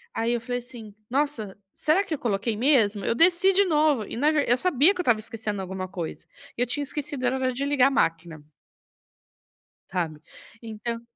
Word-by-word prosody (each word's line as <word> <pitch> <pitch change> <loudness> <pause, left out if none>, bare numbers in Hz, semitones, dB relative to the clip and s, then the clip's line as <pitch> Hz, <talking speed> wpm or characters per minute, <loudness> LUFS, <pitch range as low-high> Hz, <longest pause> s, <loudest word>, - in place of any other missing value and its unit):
aí 230 +1 0
eu 240 - -1
falei 245 +1 -3
assim: 235 -4 -10
"Nossa, 255 -6 -2 0.2
será 320 +6 +2
que 330 - -3
eu - - -8
coloquei 215 0 -1
mesmo?", 225 -6 +2
eu - - +1
desci 345 +7 +4
de 400 +2 +4
novo 300 - +2
e - - -7
na 295 +5 +3
ver 300 -2 0
eu 245 - +4
sabia 310 +2 +4
que - - -9
eu - - 0
estava 235 -8 +3
esquecendo 215 -2 -5
alguma 190 0 -5
coisa 180 -3 -6 0.3
e - - -2
eu - - +3
tinha 285 +4 -3
esquecido 285 -1 -5
era 260 0 0
de 275 +3 -3
ligar 280 -2 +4
a - - -6
máquina. 165 - -1 1.5
Sabe, 165 -5 -3 0.4
então 230 +1 -5
245 Hz, 195 wpm, -25 LUFS, 210-290 Hz, 1.5 s, desci